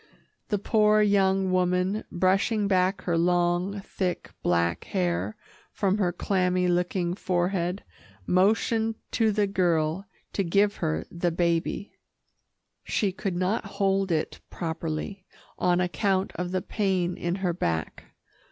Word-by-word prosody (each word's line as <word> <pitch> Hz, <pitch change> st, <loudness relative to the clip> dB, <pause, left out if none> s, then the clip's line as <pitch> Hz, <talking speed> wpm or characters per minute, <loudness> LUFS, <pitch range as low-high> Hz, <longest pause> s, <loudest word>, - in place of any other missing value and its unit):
The 210 Hz, -, +1 dB
poor 215 Hz, +1 st, +3 dB
young 195 Hz, -2 st, +2 dB
woman, 180 Hz, +3 st, +1 dB
brushing 195 Hz, +4 st, +2 dB
back 190 Hz, 0 st, +1 dB
her 170 Hz, -2 st, +1 dB
long, 175 Hz, +3 st, +1 dB
thick, 185 Hz, -2 st, -3 dB
black 85 Hz, -1 st, +1 dB
hair 180 Hz, +3 st, -1 dB, 0.4 s
from 200 Hz, 0 st, 0 dB
her 180 Hz, -3 st, +2 dB
clammy 180 Hz, 0 st, +1 dB
looking 175 Hz, 0 st, 0 dB
forehead, 180 Hz, 0 st, -1 dB, 0.4 s
motioned 220 Hz, -, +2 dB, 0.2 s
to 225 Hz, -2 st, +2 dB
the 210 Hz, 0 st, +2 dB
girl 175 Hz, -2 st, 0 dB, 0.3 s
to 200 Hz, -, 0 dB
give 200 Hz, +4 st, +2 dB
her 80 Hz, +1 st, -1 dB
the 175 Hz, 0 st, 0 dB
baby. 170 Hz, +3 st, -1 dB, 0.9 s
She 200 Hz, -3 st, 0 dB
could 190 Hz, 0 st, -3 dB
not 185 Hz, +5 st, 0 dB
hold 195 Hz, -1 st, +1 dB
it 155 Hz, -2 st, -1 dB
properly, 165 Hz, +3 st, -4 dB, 0.4 s
on 180 Hz, 0 st, +2 dB
account 190 Hz, +1 st, 0 dB
of 180 Hz, 0 st, -3 dB
the 185 Hz, 0 st, -2 dB
pain 185 Hz, -4 st, 0 dB
in 175 Hz, +1 st, -2 dB
her 185 Hz, -3 st, -1 dB
back. 80 Hz, -, -2 dB
185 Hz, 125 wpm, -26 LUFS, 175-200 Hz, 0.9 s, poor